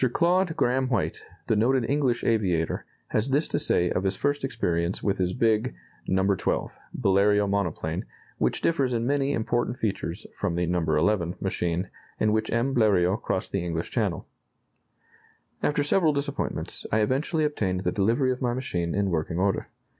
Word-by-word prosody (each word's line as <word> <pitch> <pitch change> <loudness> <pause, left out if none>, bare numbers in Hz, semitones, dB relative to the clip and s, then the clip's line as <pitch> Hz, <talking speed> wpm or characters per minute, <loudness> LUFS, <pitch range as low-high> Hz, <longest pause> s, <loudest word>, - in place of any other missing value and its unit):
Claude 175 0 +2
Grahame 130 +2 +2
White, 115 -7 -1 0.2
the - - +1
noted 120 +3 +2
English 135 -4 +1
aviator, 90 -8 0 0.2
has 110 +5 0
this 145 +4 +2
to - - -1
say 90 0 +2
of 90 - 0
his 95 0 +1
first 145 +6 -1
experience 90 -9 -1
with 100 -1 0
his 90 -1 +1
big 115 +1 +1 0.3
"No. 95 0 +2
XII." - - -1 0.2
Bleriot 100 -1 +3
monoplane 100 -4 -2 0.3
which - - 0
differs 140 -7 +1
in 115 0 -1
many 140 +1 +1
important 120 0 -1
features 100 -3 -3
from 90 -5 -2
the 90 0 +1
"No. 90 +1 0
XI." 85 +3 +1
machine 90 -1 -1 0.3
in 105 - +2
which 110 0 0
M. 120 +4 +1
Bleriot 100 -5 +3
crossed 95 - -2
the 95 -3 -1
English 85 -1 -3
Channel: - - -1 1.3
"After 145 0 +1
several 155 +1 +3
disappointments, 140 0 -2
I 110 - +3
eventually 145 +8 0
obtained 100 -11 0
the - - 0
delivery 115 +6 +2
of 125 - -4
my 120 -1 0
machine 85 -10 -2
in 100 -1 +1
working 85 +1 -1
order.... 95 +1 0
110 Hz, 165 wpm, -26 LUFS, 95-130 Hz, 1.3 s, Bleriot